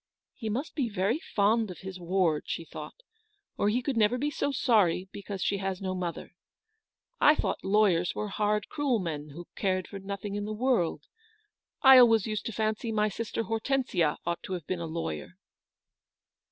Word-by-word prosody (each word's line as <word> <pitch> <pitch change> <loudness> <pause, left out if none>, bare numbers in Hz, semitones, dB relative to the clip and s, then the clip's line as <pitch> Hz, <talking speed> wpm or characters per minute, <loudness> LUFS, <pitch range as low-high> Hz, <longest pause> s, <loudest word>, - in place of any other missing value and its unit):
" - - -64
He 220 - -2
must 260 +9 -3
be 265 -6 -1
very 205 +7 0
fond 220 -3 +1
of 180 - -9
his 190 -1 -7
ward," 175 -3 +1
she 165 - -3
thought, - - -9 0.3
" 410 -2 -46
or 205 - +3
he 245 +4 0
could 275 0 -1
never 220 +3 +3
be 290 +4 -1
so 285 - -1
sorry 205 -8 +2
because 200 -2 -5
she 200 - +1
has 190 -1 -2
no 190 -1 -3
mother. 180 -3 -4 0.9
I 300 - +6
thought - - -2
lawyers 190 -4 +3
were 210 - -3
hard, 210 +1 0
cruel 285 -5 0
men, 155 -6 -4
who 170 +4 -10
cared 185 -2 0
for 200 - -8
nothing 200 +1 -5
in 205 0 -3
the 215 - -3
world. 235 -7 +1 0.8
I 265 -1 +10
always 225 -4 +6
used 215 -1 -3
to - - -3
fancy 220 +1 -1
my 215 -1 +2
sister 225 +2 -3
Hortensia 225 - 0
ought 170 0 -2
to 190 - -6
have 175 -4 -5
been 185 +2 -3
a 165 - -3
lawyer." 120 - -5
205 Hz, 190 wpm, -29 LUFS, 185-230 Hz, 0.9 s, I